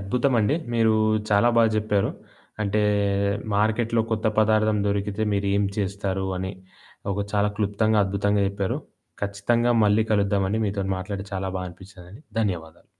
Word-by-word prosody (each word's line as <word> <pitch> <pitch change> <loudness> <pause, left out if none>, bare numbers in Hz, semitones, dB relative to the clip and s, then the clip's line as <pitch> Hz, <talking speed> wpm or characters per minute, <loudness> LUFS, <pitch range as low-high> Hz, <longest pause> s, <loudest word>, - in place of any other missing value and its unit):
అద్భుతమండి. 120 +3 +1 0.2
మీరూ 115 -2 +3 0.4
చాలా 105 +4 +4
బాగా 115 -1 +5
జెప్పారు. 105 -2 +1 0.5
అంటే, 105 +1 0 0.7
మార్కెట్‌లో 110 +2 +1
కొత్త 110 0 -1
పదార్థం 110 0 +3
దొరికితే 100 +1 -1
మీరు 100 0 0
ఏం 100 - +2
చేస్తారు 100 -1 -2
అని, 95 +1 -3 0.6
ఒక 100 - -4
చాలా 105 0 +2
క్లుప్తంగా, 105 +1 +1
అద్భుతంగా 100 +1 0
జెప్పారు. 100 -1 -2 0.4
ఖచ్చితంగా 115 +4 +1
మళ్ళీ 105 +2 +4
కలుద్దావండి. 100 +1 +1
మీతోని 95 -1 -2
మాట్లాడి 100 +1 -5
చాలా 95 0 -2
బా 90 - -3
అనిపిచ్చిందండి. 95 - -14 0.2
ధన్యవాదాలు. 85 -6 -4
100 Hz, 130 wpm, -24 LUFS, 100-110 Hz, 0.7 s, బాగా